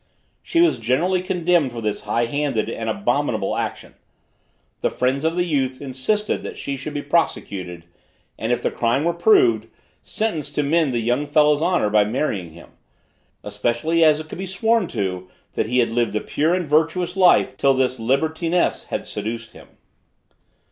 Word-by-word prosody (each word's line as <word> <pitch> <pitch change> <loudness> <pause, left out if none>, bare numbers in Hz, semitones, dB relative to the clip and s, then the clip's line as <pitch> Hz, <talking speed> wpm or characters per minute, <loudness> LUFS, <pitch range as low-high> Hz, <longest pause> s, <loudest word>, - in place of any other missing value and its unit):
She 335 - +1
was 340 - +3
generally 170 +11 +1
condemned 175 -6 +1
for 120 - -6
this 105 -2 -3
high 115 +3 +1
handed 140 -3 -1
and - - -4
abominable - - 0
action. - - -4 0.9
The - - +1
friends 130 +3 -1
of 160 +1 0
the 175 - +1
youth 135 -5 -1
insisted 140 +11 -1
that - - -7
she 140 - -4
should 140 +3 -7
be 145 - -3
prosecuted, 95 - -2 0.5
and 115 - -3
if 120 0 0
the - - 0
crime 120 +4 0
were 170 +1 +1
proved, 385 - +3 0.3
sentenced 160 -10 -3
to 150 - +1
mend 155 0 +2
the 120 -2 -1
young 125 +6 0
fellow's 150 0 +3
honor 170 - +1
by 105 -1 +5
marrying 105 - -2
him, 85 - -14 0.7
especially 155 +8 0
as 155 -1 +5
it 155 - -8
could 160 - -9
be 190 - -4
sworn 220 +1 +1
to 95 - -4 0.2
that 110 - -1
he 125 +2 0
had 120 -2 +3
lived 115 -2 0
a 105 - 0
pure 160 +4 0
and 180 -2 -2
virtuous 160 +4 +1
life 180 -8 +4
till 135 0 +3
this 130 -1 0
libertiness 160 +8 0
had - - -4
seduced 110 +2 -5
him. - - -15
145 Hz, 175 wpm, -21 LUFS, 120-170 Hz, 0.9 s, by